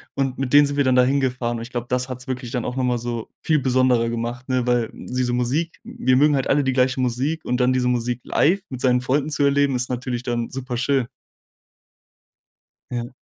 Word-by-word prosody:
und 135 -2 -1
mit 135 0 -3
denen 145 0 +8
sind 140 0 -3
wir 140 - +3
dann 130 -1 +2
da 125 - +6
hingefahren. 125 -3 0
Und - - -6
ich 120 - -10
glaube, 120 -1 -4
das 125 +1 -1
hat's 125 0 -7
wirklich 125 -2 -4
dann 125 -3 -2
auch 125 - -3
noch 130 - -1
mal 125 -1 +1
so 120 -1 -5
viel 155 -2 +2
besonderer 125 -3 +2
gemacht, 120 +3 -4
ne, 130 -1 +1
weil 120 -2 +1
diese 125 -1 -3
Musik 135 +8 -1
wir 230 - 0
mögen 150 +1 +4
halt 135 - 0
alle 145 0 +3
die 130 -1 0
gleiche 130 0 +2
Musik 130 +6 -1
und 125 - 0
dann 125 +1 +3
diese 125 -1 +1
Musik 120 0 0
live 190 +6 +2
mit 130 -2 -6
seinen 125 -1 +3
Freunden 140 +4 0
zu 145 -1 0
erleben, 140 -1 +3
ist 125 +1 -1
natürlich 125 -1 -3
dann 120 -1 -2
superschön. 130 0 -1 1.8
Ja. 120 -1 -3
125 Hz, 220 wpm, -22 LUFS, 125-135 Hz, 1.8 s, denen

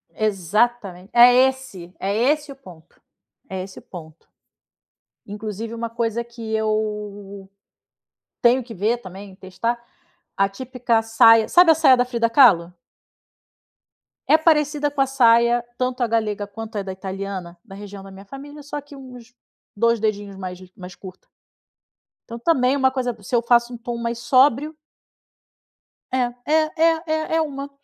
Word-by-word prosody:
Exatamente! 205 -1 -1
É 240 +1 +8
esse! 205 -10 -7
É 200 +1 -2
esse 290 +6 0
o - - -10
ponto. 180 -11 -17 0.5
É 190 -1 -4
esse 190 0 -11
o - - -18
ponto. 160 -3 -13 1.0
Inclusive 215 +2 -6
uma 230 0 -4
coisa 230 0 -2
que 230 -2 -8
eu 210 -2 -3 0.9
tenho 250 +2 +3
que 230 -1 -10
ver, 220 +5 0
também, 190 0 -11
testar, 215 +6 -4 0.6
a 195 0 +3
típica 240 +1 -1
saia 225 0 +5
sabe 355 -2 +6
a - - +4
saia 265 -5 +5
da 245 - +2
Frida 235 -2 -1
Kahlo? 195 -10 +5 1.5
É 315 - +6
parecida 300 -2 +1
com 280 - -1
a 270 - +2
saia, 235 -2 +3
tanto 255 0 -2
a 240 - +1
galega 215 -2 -1
quanto 225 +1 -8
a 200 - -2
da 190 - -6
italiana, 190 -2 -7
da 195 -4 -12
região 200 -1 -10
da 195 - -12
minha 195 +1 -13
família, 290 +6 -11
só 290 +1 -6
que 285 0 -15
uns 250 -3 -13 0.4
2 230 +1 +2
dedinhos 205 -2 -3
mais 185 -1 -7
g 185 0 -16
mais 180 -1 -10
curta. 185 -1 -13 1.1
Então - - -5
também 255 -1 +1
é - - -1
uma 265 -1 +2
coisa 250 -2 -3
se 245 - -3
eu 235 - +3
faço 240 +1 +2
tom 235 0 -5
mais 235 0 -4
sóbrio 270 +4 +2 1.4
É. 245 -2 0
É 305 - +1 0.2
é 325 0 +2
é 315 +1 -2
é - - +2
uma. 280 -2 -5
230 Hz, 155 wpm, -21 LUFS, 200-255 Hz, 1.5 s, É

